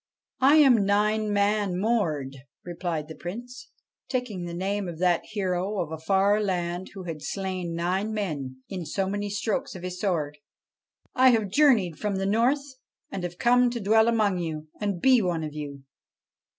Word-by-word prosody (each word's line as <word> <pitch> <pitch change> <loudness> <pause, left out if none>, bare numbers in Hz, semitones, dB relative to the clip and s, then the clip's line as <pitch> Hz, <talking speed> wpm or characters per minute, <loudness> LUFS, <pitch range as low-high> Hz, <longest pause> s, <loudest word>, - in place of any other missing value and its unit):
' - - -63
I - - +7
am 265 -9 +6
Nine 210 +2 +1
Man 205 -2 +1
Mord,' 160 - 0 0.3
replied 170 -3 -4
the 160 - -8
Prince, 240 - -8 0.4
taking 240 -9 -3
the 170 - -6
name 195 +2 -2
of 170 -2 -6
that 175 -1 +2
hero 195 -1 -2
of 165 -3 -2
a 160 - -5
far 195 +5 +2
land 180 -2 -2
who 190 - -7
had 165 -4 -6
slain 185 -1 -3
nine 185 +5 -1
men 145 -11 -4
in 185 -3 -5
so 190 +5 -1
many 205 +1 -2
strokes 210 0 -2
of 180 - -8
his 180 0 -5
sword. 155 -7 -1 0.4
' - - -68 0.3
I 260 0 +6
have 220 -5 +2
journeyed 215 - +3
from 210 -2 -1
the 195 0 -1
North 260 +6 +1 0.3
and 195 - -4
have 175 0 -5
come 245 +1 +4
to 240 0 -4
dwell 220 +2 +4
among 215 -5 +2
you, 155 -2 -5
and 200 -4 -2
be 255 +3 +5
one 175 -4 -1
of 155 -1 -5
you.' 145 -2 -7
195 Hz, 180 wpm, -26 LUFS, 175-215 Hz, 0.4 s, I